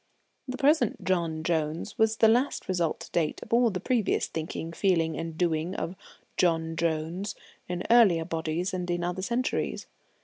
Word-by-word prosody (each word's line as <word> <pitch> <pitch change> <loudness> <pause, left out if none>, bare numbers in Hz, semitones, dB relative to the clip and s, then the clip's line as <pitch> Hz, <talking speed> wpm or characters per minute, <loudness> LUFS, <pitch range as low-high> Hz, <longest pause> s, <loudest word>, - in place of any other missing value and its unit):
The 255 0 -4
present 285 -5 +2
John 170 -4 0
Jones 160 -1 -1
was 220 0 +3
the 225 - +6
last 245 +5 +2
result 175 -4 0
to - - -10
date 160 -3 0
of - - -7
all 240 0 +5
the 185 -3 -3
previous 235 -2 +1
thinking, 160 +1 -5
feeling, 165 -4 +1
and 165 -1 -5
doing 170 +1 0
of 180 - -3 0.4
John 165 -2 +1
Jones 165 +4 -2 0.3
in 180 0 -2
earlier 195 -9 +6
bodies 165 +2 -2
and 180 -1 -3
in 175 0 -1
other 180 +1 -2
centuries. 240 +6 -1
175 Hz, 165 wpm, -28 LUFS, 165-205 Hz, 0.4 s, the